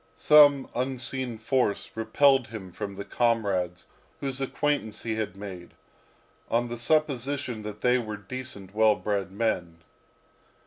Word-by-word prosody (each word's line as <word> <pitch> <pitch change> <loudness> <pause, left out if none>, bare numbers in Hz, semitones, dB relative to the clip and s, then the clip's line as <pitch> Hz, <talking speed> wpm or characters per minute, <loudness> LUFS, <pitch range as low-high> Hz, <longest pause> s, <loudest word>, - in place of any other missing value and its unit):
Some 145 -2 +6
unseen 130 -1 -2
force 115 -1 0
repelled 130 +4 +3
him 105 -4 -8
from 100 +2 -6
the 100 +1 -6
comrades 100 -6 0 0.3
whose 135 -1 -3
acquaintance 135 -5 -1
he 115 - -1
had 110 -4 -3
made, 95 -4 -9 0.7
on 120 +1 +1
the 120 0 -5
supposition 140 -3 0
that 105 0 -7
they 125 0 +3
were 110 -3 -5
decent, 100 -3 -6
well 110 0 +4
bred 100 -3 -2
men. 95 -6 -1
115 Hz, 130 wpm, -27 LUFS, 100-130 Hz, 0.7 s, Some